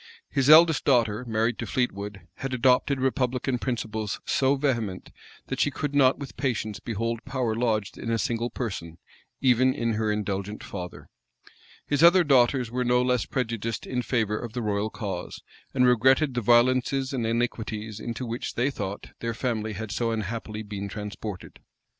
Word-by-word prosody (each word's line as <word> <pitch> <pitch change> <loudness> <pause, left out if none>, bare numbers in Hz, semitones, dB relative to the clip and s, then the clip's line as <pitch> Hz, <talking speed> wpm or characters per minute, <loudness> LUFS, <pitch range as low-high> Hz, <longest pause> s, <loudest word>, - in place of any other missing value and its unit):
His 135 0 +2
eldest 160 0 +7
daughter, 120 -4 +2
married 115 +1 0
to - - -3
Fleetwood, 100 -5 -2 0.2
had 135 -1 -3
adopted 130 +2 +3
republican 130 -1 0
principles 110 -4 -3
so 135 +1 +2
vehement, 120 -9 -2 0.3
that - - -4
she - - +3
could 145 +1 -4
not 135 -2 +4
with 140 -2 -8
patience 110 -6 -2
behold 115 +1 -3
power 130 -4 -1
lodged 110 -3 -1
in 115 - -4
a 115 - +1
single 115 +1 -1
person, 90 -10 -5 0.4
even 130 0 +4
in 115 -1 0
her 110 0 0
indulgent 105 0 -3
father. 90 -3 -7 0.8
His 145 0 0
other 175 +2 +7
daughters 125 -4 +3
were 125 +1 0
no 125 0 +3
less 125 -2 +1
prejudiced 115 -3 -2
in 125 -1 -2
favor 110 -3 0
of 115 -2 -7
the 120 -1 -3
royal 105 0 0
cause, 95 -5 -6 0.3
and 125 -1 +3
regretted 130 +4 +4
the 120 - -1
violences 130 +4 +3
and 125 -3 -1
iniquities 110 -2 -2
into 120 +3 -4
which, 120 +1 -4
they 130 +4 +1
thought, 100 -6 -6
their 115 -1 -3
family 110 -3 -2
had 105 +1 -5
so 115 +1 0
unhappily 110 0 -4
been 100 -1 -5
transported. 105 -2 -7
120 Hz, 165 wpm, -26 LUFS, 110-130 Hz, 0.8 s, eldest